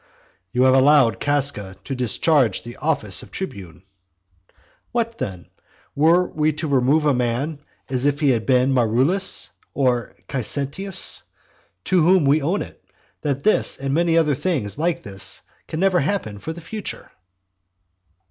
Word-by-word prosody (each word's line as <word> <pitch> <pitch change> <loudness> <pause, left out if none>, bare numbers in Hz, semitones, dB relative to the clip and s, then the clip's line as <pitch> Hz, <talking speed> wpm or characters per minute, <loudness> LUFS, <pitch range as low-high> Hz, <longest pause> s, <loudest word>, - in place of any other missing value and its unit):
"You 125 +4 +2
have 130 0 +5
allowed 135 -3 +4
Casca 140 -9 -1
to 135 - -5
discharge 125 +1 +1
the 120 0 -9
office 145 - -1
of - - -13
tribune". 95 - -7 1.1
What 230 -1 -2
then? 90 -3 -6 0.4
Were 165 +5 +4
we 155 0 0
to 155 +2 -4
remove 140 +3 +2
a 145 - +4
man, 125 +5 -1 0.3
as 130 0 -1
if 145 0 +1
he 145 -3 +3
had 115 -3 -1
been 130 0 +3
Marullus, 130 - +2 0.2
or 125 -4 0
Caesetius, 140 - -1 0.6
to 185 -2 +2
whom 175 0 +4
we 145 +3 +3
own 175 +8 0
it, - - -15 0.4
that 140 -2 -2
this 215 - +3
and 135 0 -3
many 165 +1 +2
other 155 -3 +3
things 135 - -2
like 170 +2 -1
this 95 -1 -4 0.2
can 155 - -5
never 190 -1 +3
happen 140 - -2
for 160 - -5
the 170 +1 -9
future? 210 +4 -6
140 Hz, 150 wpm, -21 LUFS, 125-165 Hz, 1.1 s, have